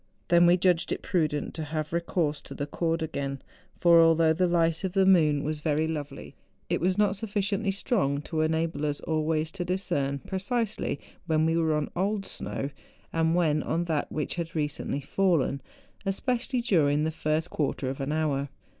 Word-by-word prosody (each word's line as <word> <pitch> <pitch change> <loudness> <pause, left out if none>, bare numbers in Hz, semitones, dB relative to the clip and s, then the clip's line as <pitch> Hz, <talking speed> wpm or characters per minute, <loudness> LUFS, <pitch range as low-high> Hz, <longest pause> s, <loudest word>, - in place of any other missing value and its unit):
Then 175 0 +6
we 175 +1 +6
judged 180 -2 +2
it - - -3
prudent 155 -5 0
to 160 - -4
have 155 +1 -4
recourse 170 -3 0
to - - -10
the 145 - -3
cord 165 +2 -1
again; 140 -3 -3 0.4
for 170 -1 +7
although 165 -1 +5
the 180 +3 +2
light 165 -1 +1
of 190 -2 -2
the 195 -1 +4
moon 155 -6 +4
was 155 0 -2
very 155 0 +1
lovely, 145 -3 -5 0.4
it - - 0
was 185 +2 +1
not 205 -2 +3
sufficiently 205 0 -1
strong 195 - 0
to 155 0 -2
enable 160 -1 0
us 145 -1 -2
always 155 0 0
to 180 0 -4
discern 145 -7 -1
precisely 200 - -2 0.3
when 155 -1 +2
we 165 0 +2
were 160 -2 +2
on 150 -1 -2
old 195 +2 0
snow 140 - -5 0.4
and 165 0 +2
when 155 -4 +2
on 170 +4 -1
that 160 -4 -1
which 150 -2 -2
had 165 -1 -4
recently 150 -2 -2
fallen, 150 -3 +1 0.4
especially 245 +5 -1
during 150 -10 +2
the 160 - 0
first 155 +2 -1
quarter 140 -2 -1
of 135 +1 -4
an 135 +2 -2
hour. 145 -3 0
160 Hz, 180 wpm, -27 LUFS, 150-180 Hz, 0.4 s, for